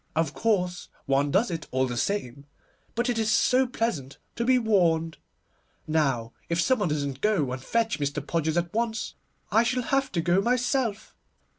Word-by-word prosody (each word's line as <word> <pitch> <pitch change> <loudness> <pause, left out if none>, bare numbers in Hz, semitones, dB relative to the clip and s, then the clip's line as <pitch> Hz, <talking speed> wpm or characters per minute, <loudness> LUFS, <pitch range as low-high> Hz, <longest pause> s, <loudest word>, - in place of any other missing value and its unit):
Of 160 -2 +1
course, 180 +2 0 0.2
one 140 +1 +2
does 195 +7 +2
it 165 -2 -5
all 130 0 +1
the 125 -1 -4
same, 140 -4 -2 0.5
but 240 +2 0
it 240 -2 0
is 220 -1 +1
so 255 +4 +3
pleasant 200 - -3 0.2
to 235 - -1
be 255 +1 +4
warned. 170 -8 +2 0.7
Now 135 -7 0 0.2
if 170 0 0
some 260 +6 +3
one 195 -5 0
doesn't 140 -3 -2
go 185 -12 +1
and 130 0 -4
fetch 230 +1 0
Mr. 145 0 -2
Podgers 160 0 0
at 170 0 -1
once, 225 -1 -1 0.4
I 220 - +5
shall 250 +2 0
have 270 +2 0
to 175 - 0
go 175 +3 +3
myself. 245 -1 0
180 Hz, 175 wpm, -26 LUFS, 145-230 Hz, 0.7 s, I